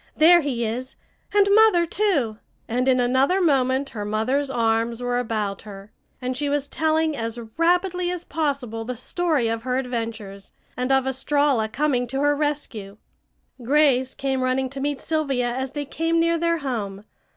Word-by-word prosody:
There 345 +2 +7
he 250 -6 -2
is! 250 +4 -4 0.4
And 405 -1 +4
Mother, 430 -5 +5
too!" 315 - 0 0.3
and 250 +3 -1
in 255 -1 +4
another 260 +9 +2
moment 275 -5 +2
her 210 -3 -5
mother's 235 +7 0
arms 230 -1 0
were 245 0 -1
about 215 -4 -2
her, 200 -1 -11 0.3
and 255 0 -3
she 290 +2 -2
was 285 -1 -1
telling 315 0 0
as 230 -2 -4 0.2
rapidly 355 +1 +1
as 355 -1 -4
possible 275 -8 -2
the 250 +2 -5
story 300 +1 0
of 225 0 -2
her 250 +1 -1
adventures, 225 -6 -5 0.2
and 250 +2 -2
of 265 -1 +3
Estralla 265 -3 +1
coming 255 -1 0
to 270 +3 -2
her 290 0 +3
rescue. 280 -9 -3 0.6
Grace 260 0 +2
came 265 -1 -1
running 255 0 0
to 275 - -6
meet 285 -1 -1
Sylvia 275 -6 -1
as 260 +1 -4
they 290 -1 -3
came 330 +4 0
near 335 0 +2
their 335 0 +1
home. 220 -9 -4
265 Hz, 165 wpm, -23 LUFS, 235-300 Hz, 0.6 s, There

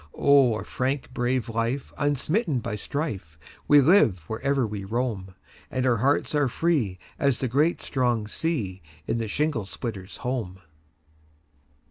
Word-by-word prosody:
a 135 -6 +4
brave - - -14
frank 130 +2 -2 0.4
life, 115 +4 -2
unsmitten 145 - +1
by 110 -3 -3
strife, 105 - -4 0.3
We 145 -1 +7
live 135 - +4
wherever 135 +3 0
we 105 -2 -5
roam, 105 -3 -3 0.3
And 130 0 -1
our 125 -2 +3
hearts 140 +8 +1
are 145 -2 +3
free 130 - 0 0.2
as 140 -4 +2
the 130 - -1
great 150 +8 +1
strong 120 -5 0
sea, 110 - -2 0.2
In 115 - -1
the 115 - -2
shingle 145 -2 -1
splitter's 100 -4 -6
home. 115 -8 -3
125 Hz, 135 wpm, -26 LUFS, 105-145 Hz, 0.4 s, We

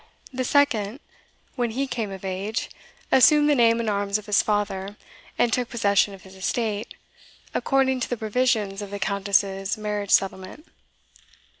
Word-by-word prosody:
The 255 0 -2
second, 250 -4 +1 0.6
when 245 -2 0
he 260 +5 -2
came 230 -5 -3
of 195 0 -8
age, 195 +4 -3 0.4
assumed 295 +3 +6
the 295 - +4
name 230 -3 +4
and 230 - -2
arms 200 -1 0
of 210 - -10
his 210 -1 +3
father, 205 -1 -2 0.4
and 235 - +2
took 250 -2 0
possession 200 -3 +2
of 190 - -17
his 190 - -14
estate, 210 +2 -2 0.6
according 265 -1 +1
to 245 - -3
the 245 - -2
provisions 220 -3 0
of 205 - -7
the 200 - -5
Countess's 195 0 0
marriage 210 -1 -3
settlement. 190 - 0
210 Hz, 155 wpm, -24 LUFS, 200-245 Hz, 0.6 s, assumed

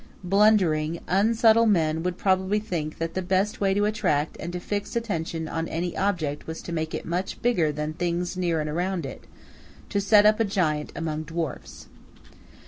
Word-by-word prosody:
Blundering, 180 -5 +3
unsubtle 225 +3 +4
man 160 -6 +2
would 180 +1 -2
probably 190 +1 +1
think 170 -8 -4
that 165 0 -3
the 185 - -1
best 190 +3 0
way 195 -1 +3
to 205 +1 +2
attract 160 -8 0
and 170 - -5
to 180 - -4
fix 205 +4 -4
attention 165 -8 -2
on 165 +1 -3
any 175 +2 -3
object 170 -7 -1
was 160 0 -6
to - - -7
make 160 -1 -2
it - - -5
much 180 +3 -3
bigger 180 -11 +2
than 150 +1 -3
things 175 +2 -2
near 175 -3 0
and 155 - -2
around 175 +1 -2
it, 135 - -8 0.6
to 200 - 0
set 205 +1 +5
up 215 +1 +5
a - - +4
giant 160 -7 0
among 155 -2 -3
dwarfs. 165 0 -5
175 Hz, 180 wpm, -25 LUFS, 160-200 Hz, 0.6 s, set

